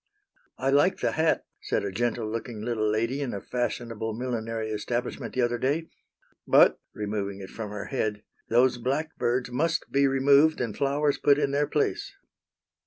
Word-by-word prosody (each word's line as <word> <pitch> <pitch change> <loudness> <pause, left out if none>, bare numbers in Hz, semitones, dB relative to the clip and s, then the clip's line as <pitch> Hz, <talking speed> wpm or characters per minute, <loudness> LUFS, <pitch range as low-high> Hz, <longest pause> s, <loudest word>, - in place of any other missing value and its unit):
"I 135 +1 0
like 145 +7 +4
the - - +1
hat," 160 0 +1 0.2
said - - -1
a 100 - -2
gentle 120 +2 -1
looking 115 0 -5
little 110 -2 0
lady 115 +6 0
in 130 -6 -3
a - - -3
fashionable 115 -2 -3
millinery 115 -2 -3
establishment 120 +3 -3
the 130 - +2
other 120 0 0
day, 150 +6 0 0.6
"but," - - +6 0.2
removing 100 -2 -3
it 95 - -9
from 110 -2 -6
her 105 -1 -5
head, 110 -6 -2 0.3
"those 120 +1 +3
blackbirds 130 -2 -1
must 160 +6 -1
be 140 0 +4
removed 140 +3 +4
and 115 -4 -2
flowers 145 +1 +1
put 145 -1 +4
in 140 -2 +1
their 145 +1 +1
place." 395 - -1
120 Hz, 165 wpm, -27 LUFS, 110-140 Hz, 0.6 s, but